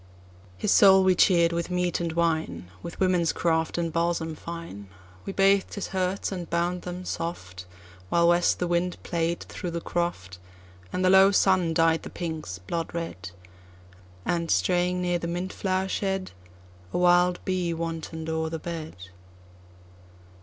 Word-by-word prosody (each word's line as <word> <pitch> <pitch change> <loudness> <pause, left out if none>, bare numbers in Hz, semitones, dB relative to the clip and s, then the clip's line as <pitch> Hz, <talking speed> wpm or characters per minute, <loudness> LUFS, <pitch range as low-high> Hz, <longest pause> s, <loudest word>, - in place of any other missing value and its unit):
His - - 0
soul 190 -2 +7
we 185 0 +5
cheer'd 170 -2 +4
with 170 +1 -2
meat 180 -1 0
and 170 -1 -2
wine; 160 - -1
With 170 - -8
women's 180 -3 +2
craft 160 -1 0
and 165 -2 -2
balsam 165 -1 -1
fineWe 100 - -9
bath'd 195 0 +3
his 200 - -4
hurts, 190 +1 -1
and 180 -3 -5
bound 175 +1 0
them 180 +1 -6
soft, 90 - -5 0.4
While 170 0 +4
west 175 0 +3
the 180 - -1
wind 175 +1 0
played 170 0 -1
through 180 - -6
the 170 0 -3
croft, 130 - -3 0.5
And 185 - -1
the 185 - +5
low 190 0 +7
sun 185 -4 +3
dyed 165 0 +3
the - - -8
pinks 160 - -5
blood 165 - -4
red, 165 - -5 1.0
And, 170 -1 -1
straying 180 0 +1
near 175 -1 0
the 170 - -4
mint 175 +2 -3
flower 190 0 -1
shed,A 90 - -5
wild 180 0 +4
bee 185 -2 0
wanton'd 165 -1 -5
o'er 160 0 -1
the 165 - -3
bed. 160 -1 -6
170 Hz, 150 wpm, -26 LUFS, 160-180 Hz, 1.0 s, soul